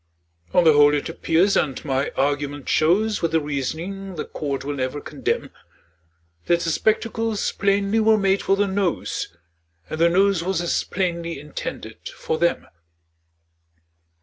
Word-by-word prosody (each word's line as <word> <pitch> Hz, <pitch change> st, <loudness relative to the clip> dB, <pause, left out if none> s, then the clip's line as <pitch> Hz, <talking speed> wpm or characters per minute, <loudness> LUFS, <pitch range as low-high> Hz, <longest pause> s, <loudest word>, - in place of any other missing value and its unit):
On 180 Hz, -, +4 dB
the 160 Hz, -2 st, +6 dB
whole 145 Hz, 0 st, +6 dB
it 145 Hz, -, -2 dB
appears, 165 Hz, +4 st, +2 dB
and 135 Hz, -1 st, 0 dB
my 135 Hz, 0 st, 0 dB
argument 145 Hz, 0 st, -1 dB
shows 205 Hz, +7 st, +2 dB
With 165 Hz, -1 st, 0 dB
a -, -, +5 dB
reasoning 160 Hz, +7 st, -4 dB
the 155 Hz, -, -4 dB
court 140 Hz, -3 st, -4 dB
will 145 Hz, -, -2 dB
never 130 Hz, +1 st, -3 dB
condemn, -, -, -3 dB, 1.0 s
That 170 Hz, 0 st, +3 dB
the 165 Hz, -, 0 dB
spectacles 220 Hz, +2 st, 0 dB
plainly 200 Hz, +2 st, +1 dB
were 220 Hz, 0 st, +4 dB
made 195 Hz, -1 st, +2 dB
for 195 Hz, -, +2 dB
the 205 Hz, +1 st, +2 dB
Nose, 190 Hz, -, -2 dB, 0.5 s
And 155 Hz, -, -3 dB
the 170 Hz, -, +6 dB
Nose 190 Hz, 0 st, +3 dB
was 185 Hz, -1 st, -1 dB
as 175 Hz, 0 st, 0 dB
plainly 170 Hz, -4 st, -2 dB
intended 150 Hz, 0 st, -7 dB
for 160 Hz, -, -3 dB
them. 170 Hz, 0 st, +1 dB
170 Hz, 150 wpm, -23 LUFS, 145-195 Hz, 1.0 s, the